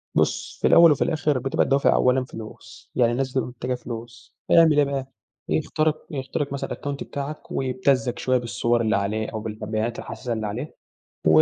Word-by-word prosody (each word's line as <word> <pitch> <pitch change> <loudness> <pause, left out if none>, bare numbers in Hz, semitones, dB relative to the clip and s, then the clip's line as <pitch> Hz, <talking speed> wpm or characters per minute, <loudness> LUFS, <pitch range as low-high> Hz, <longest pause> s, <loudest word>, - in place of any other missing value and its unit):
بُصّ، - - 0
في - - +4
الأول 170 -1 +8
وفي 145 - +2
الآخر 150 -4 0
بتبقى 135 +2 +1
الدوافع 140 +2 +3
أولًا 125 +1 +3
فلوس، 110 0 -11
يعني 120 -2 +3
الناس 130 +2 -1
بتبقى 130 0 -1
محتاجة 125 +1 -4
فلوس، 115 -2 -9
فيعمل 160 -3 +6
إيه 145 - +6
بقى؟ 135 -1 -4 0.4
يخترق 155 0 0
يخترق 140 +1 -3
مثلًا 140 - -4
الأكاونت 140 -1 -4
بتاعك، 145 +2 -6
ويبتزك 130 -1 0
شوية 130 0 +2
بالصور 120 0 0
اللي 110 -3 +2
عليه 105 +2 -1
أو 110 - -4
بالبيانات 110 +1 -3
الحساسة 125 -2 -5
اللي 110 -1 -2
عليه 120 +9 -5 0.5
و 80 0 +7
125 Hz, 175 wpm, -24 LUFS, 115-140 Hz, 0.5 s, الأول